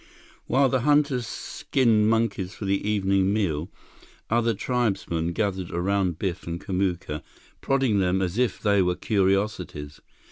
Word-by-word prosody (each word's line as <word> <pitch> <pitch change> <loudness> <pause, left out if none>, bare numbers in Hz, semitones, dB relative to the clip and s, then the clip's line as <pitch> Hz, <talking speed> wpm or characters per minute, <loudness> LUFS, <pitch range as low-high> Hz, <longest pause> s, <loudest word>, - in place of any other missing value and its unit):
While 135 +1 +4
the 130 0 +1
hunters 145 -3 +2
skinned 110 -5 +1
monkeys 105 -4 0
for 105 - -6
the 100 +1 0
evening 95 -2 +2
meal, 90 -6 -1 0.6
other 115 -1 +2
tribesmen 95 -9 -1
gathered 95 -2 -2
around 90 -1 0
Biff 90 -2 -3
and 85 0 -3
Kamuka, 90 -5 -2 0.4
prodding 135 -7 +2
them 95 0 +2
as 95 +3 -1
if 125 -2 +1
they 100 -2 +3
were 90 -1 +1
curiosities. 95 -8 -1
100 Hz, 135 wpm, -25 LUFS, 90-115 Hz, 0.6 s, While